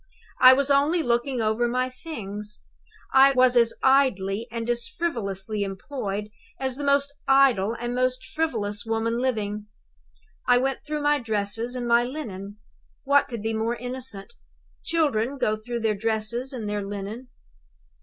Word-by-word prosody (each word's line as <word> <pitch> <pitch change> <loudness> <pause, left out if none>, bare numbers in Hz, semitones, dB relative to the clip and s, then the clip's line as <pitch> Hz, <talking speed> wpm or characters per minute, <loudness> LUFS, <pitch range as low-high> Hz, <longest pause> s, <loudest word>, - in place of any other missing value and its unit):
"I 255 0 +10
was 280 +1 +1
only 300 +5 +3
looking 240 0 0
over 220 +3 +1
my 255 +1 0
things; 210 - -7 0.5
I 270 +1 +7
was 255 -1 +4
as 235 -1 +5
idly 230 -6 +2
and 230 0 -4
as 240 -1 0
frivolously 215 - -3
employed 200 0 -4 0.3
as 265 -1 -2
the 290 - -5
most 280 0 +2
idle 250 -6 +4
and 240 +1 -3
most 255 +1 0
frivolous 220 -11 -2
woman 225 +1 -1
living. 210 -5 -2 0.8
I 245 0 +6
went 265 +1 0
through 300 -1 -2
my 295 0 +3
dresses, 225 +1 -1
and 245 -1 -3
my 235 0 +4
linen. 215 -7 -6 0.5
What 280 +1 +3
could 235 -5 -6
be 225 0 -1
more 225 +2 -1
innocent? 245 -5 -5 0.5
Children 280 -6 0
go 215 -5 +1
through 235 +2 -5
their 220 -1 +2
dresses 225 +4 -2
and 235 -5 -5
their 205 0 -2
linen. 205 +5 -6
240 Hz, 150 wpm, -25 LUFS, 215-265 Hz, 0.8 s, I